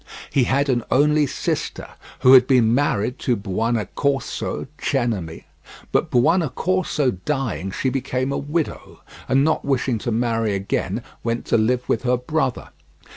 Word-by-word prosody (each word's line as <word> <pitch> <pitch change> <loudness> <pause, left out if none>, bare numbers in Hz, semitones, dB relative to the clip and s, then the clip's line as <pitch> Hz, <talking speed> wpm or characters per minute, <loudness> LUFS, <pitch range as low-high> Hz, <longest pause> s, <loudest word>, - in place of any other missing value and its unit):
He 130 -3 +3
had 140 +4 +1
an 120 -3 +1
only 150 +1 +3
sister, - - -3 0.3
who 130 - +7
had 125 -1 +8
been 120 -4 +4
married 125 -3 0
to 125 - +1
Buonaccorso 115 +7 -2
Cenami, 110 - -2 0.5
but - - +1
Buonaccorso 155 - +1
dying 135 -9 -2
she 130 +7 -1
became 130 0 -2
a - - -1
widow, 150 +3 -4 0.3
and 135 +1 +4
not 160 +1 +1
wishing 130 -4 0
to 120 - -3
marry 115 -2 0
again 100 +3 -2 0.2
went 115 0 -2
to - - +1
live 125 +3 0
with - - 0
her 125 0 +1
brother. 135 +1 -2
125 Hz, 140 wpm, -22 LUFS, 115-140 Hz, 0.5 s, had